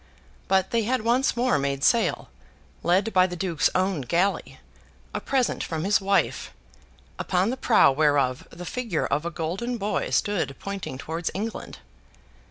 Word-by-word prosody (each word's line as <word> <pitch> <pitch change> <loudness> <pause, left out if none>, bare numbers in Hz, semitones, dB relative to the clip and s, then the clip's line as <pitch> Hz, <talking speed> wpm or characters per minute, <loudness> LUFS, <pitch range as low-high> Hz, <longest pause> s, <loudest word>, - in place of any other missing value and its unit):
But 190 0 +2
they 230 - +2
had 245 +3 0
once 240 +2 +2
more 245 - +2
made 140 0 -2
sail, 235 -1 +2 0.5
led 190 +6 +1
by 185 -1 +5
the 180 - -6
Duke's 170 -3 +1
own 185 -4 +1
galley, 175 +10 -1 0.5
a - - -3
present 265 -3 0
from 160 -1 -3
his 200 +2 +2
wife, 195 0 0 0.7
upon 185 +4 +1
the - - -2
prow 225 - +4
whereof 140 -3 +1
the 180 +1 -9
figure 225 -6 -2
of 150 +3 -1
a - - -1
golden 185 +10 -3
boy 210 -1 -2
stood 200 -9 0
pointing 200 -9 -6
towards 165 +4 -3
England. 215 +3 -5
190 Hz, 155 wpm, -25 LUFS, 165-225 Hz, 0.7 s, by